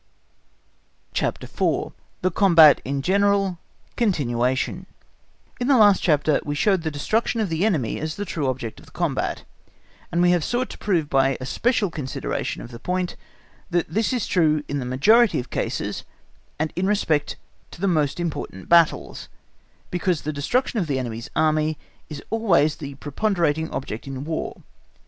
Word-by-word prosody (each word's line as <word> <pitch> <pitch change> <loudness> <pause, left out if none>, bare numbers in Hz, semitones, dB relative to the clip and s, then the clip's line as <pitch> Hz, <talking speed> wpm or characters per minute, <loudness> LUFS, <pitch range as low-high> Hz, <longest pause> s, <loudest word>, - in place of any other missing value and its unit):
CHAPTER - - -1
IV. - - -1 0.3
The 185 - +2
Combat 165 -6 +6
in 140 +1 -3
General 195 -1 +2 0.4
(continuation) 135 - 0 0.7
In 245 - -1
the 275 -2 +5
last 205 -4 +6
chapter 150 -2 +2
we 145 - -3
showed 190 +4 +2
the 160 - -2
destruction 215 +11 -1
of 215 -4 0
the 165 +2 -1
enemy 160 - 0
as 155 0 -3
the 205 - -4
true 155 -7 -2
object 125 -3 -4
of - - -17
the - - -18
combat, - - -2 0.7
and 170 - 0
we 175 0 +5
have 175 -3 +2
sought 245 +7 -1
to - - -10
prove 170 -7 0
by 135 -1 +2
a 130 - -6
special 215 - 0
consideration 130 - -4
of 120 - -10
the 115 - -9
point, 180 +4 -2 0.5
that 175 -3 0
this 220 +5 +1
is 245 -6 -1
true 155 -4 +2
in 145 - -2
the 125 - -4
majority 210 - +4
of 125 - -7
cases, - - -3 0.5
and 155 +1 -2
in 185 +2 0
respect 165 -8 +1 0.3
to - - -13
the 195 - 0
most 155 -4 +1
important 155 - -4
battles, 170 -2 +2 0.6
because 180 -2 0
the 155 - -3
destruction 230 - 0
of 175 - -1
the 140 -3 0
enemy's 115 -3 -5
Army 155 0 +2 0.3
is 150 -2 -7
always 175 -10 +2
the 140 -2 -7
preponderating 160 +1 0
object 125 -2 -5
in 135 0 -5
War. 160 0 -4
160 Hz, 165 wpm, -23 LUFS, 140-195 Hz, 0.7 s, Combat